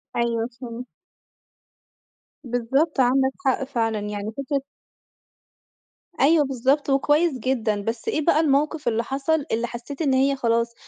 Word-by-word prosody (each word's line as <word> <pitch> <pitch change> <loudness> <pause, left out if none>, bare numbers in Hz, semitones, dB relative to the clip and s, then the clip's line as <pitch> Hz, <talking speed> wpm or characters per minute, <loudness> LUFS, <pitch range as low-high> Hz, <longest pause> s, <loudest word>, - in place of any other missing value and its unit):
أيوه، 235 -1 0
فهمت. 245 0 -7 1.6
بالضبط، 265 +5 0
عندك 265 +1 +3
حق 265 0 +2
فعلًا 230 -5 -1
يعني 210 +1 -4
فكرة 275 0 -1 1.6
أيوه 300 +1 +5
بالضبط، 270 +3 0
وكويس 295 +4 +3
جدًا، 220 -4 0
بس 225 +2 -4
إيه 310 - 0
بقى 325 -3 +4
الموقِف 300 -1 +1
اللي 230 0 +1
حصل، 280 +4 -1
اللي 230 +2 0
حسيت 245 +6 -7
إن 275 -4 +2
هي 275 +1 +3
خلاص 235 -2 0
260 Hz, 125 wpm, -23 LUFS, 235-280 Hz, 1.6 s, أيوه